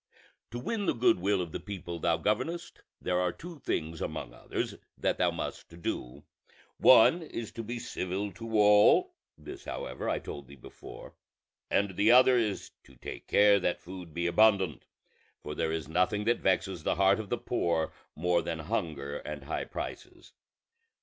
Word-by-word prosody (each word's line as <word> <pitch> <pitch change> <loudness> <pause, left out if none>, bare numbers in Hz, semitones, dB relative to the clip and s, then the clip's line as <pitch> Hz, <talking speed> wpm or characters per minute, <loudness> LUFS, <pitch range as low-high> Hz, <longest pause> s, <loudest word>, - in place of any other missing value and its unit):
To 120 - -6
win 200 - -2
the - - +2
good 120 -5 +3
will 100 +1 +1
of 85 - -8
the - - -4
people 90 -4 -6
thou 85 0 +2
governest, 160 - -2 0.2
there 90 0 0
are 90 -1 +1
two 170 - -10
things 80 - -3
among 75 -6 -4
others - - -4 0.2
that - - 0
thou - - +4
must 85 - -6
do: - - -4 0.6
one 130 +8 +7
is 120 -8 -6
to 115 - -6
be 120 +2 -4
civil 100 -2 -3
to 110 +4 -4
all 105 0 +6 0.2
(this 75 - -10
however - - -4
I - - +1
told 70 -2 -8
thee 70 - -12
before), 65 - -12 0.6
and 100 -2 +1
the 105 +3 +3
other 125 +1 +7 0.2
to 65 - -15
take - - -8
care 100 0 +5
that 90 -1 -1
food 90 -2 -9
be 85 +2 -3
abundant; 95 -2 +3 0.6
for 75 - -5
there 80 +1 -1
is 80 -3 -3
nothing 90 +5 +1
that 120 +2 +2
vexes 95 -2 0
the - - 0
heart 100 +2 +4
of 105 -3 -6
the - - 0
poor 80 -2 -1 0.2
more 90 +2 +2
than 85 0 -3
hunger 80 -6 -3
and 75 -2 -7
high 75 - -3
prices. - - -8
95 Hz, 170 wpm, -30 LUFS, 80-110 Hz, 0.6 s, one